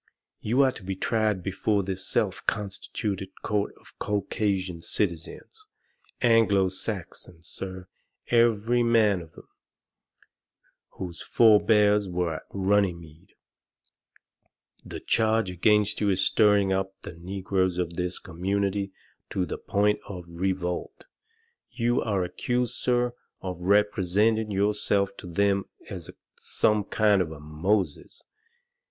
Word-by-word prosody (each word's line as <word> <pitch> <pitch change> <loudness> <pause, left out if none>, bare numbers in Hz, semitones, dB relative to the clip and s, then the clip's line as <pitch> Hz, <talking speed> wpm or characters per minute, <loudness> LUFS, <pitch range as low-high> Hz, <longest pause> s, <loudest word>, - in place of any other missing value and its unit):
"You 125 +6 +2
are 130 - +3
to - - -11
be 95 +1 -3
tried 105 -2 0
before 100 +2 0
this 95 0 -4
self - - 0
constituted 100 -1 -3
court 105 -1 -1
of - - -18
Caucasian 100 -3 -1
citizens 95 - -3 0.6
Anglo 110 -5 +4
Saxons, 90 -3 -6
sir, 95 -1 -7 0.4
every 120 0 +3
man 110 -5 +3
of 80 -1 -13
them, - - -15 1.5
whose 90 -2 -7
forbears 105 -2 +4
were 90 -2 -1
at - - -12
Runnymede! 95 -5 -1 1.5
The - - -8
charge 110 -3 +2
against 105 +4 +2
you 105 - +2
is 95 -1 +2
stirring 105 -3 +4
up 95 0 -2
the - - -7
negroes 95 +1 -1
of 85 -1 -1
this 90 +1 -3
community 100 +3 -2 0.4
to 95 - -1
the 80 - -5
point 105 +1 +1
of 90 -3 -7
revolt. 90 +1 -3 0.6
You 120 0 0
are 100 -4 0
accused, 120 +7 -1
sir, 125 -1 0 0.3
of 90 -2 -5
representing 105 +2 +2
yourself 100 0 +1
to - - -9
them 100 +3 +1 0.3
as - - -6 0.3
some 105 -2 +1
kind 105 -2 +3
of 80 -3 -2
a 80 - -9
Moses. 80 +3 -2
100 Hz, 120 wpm, -26 LUFS, 90-105 Hz, 1.5 s, Anglo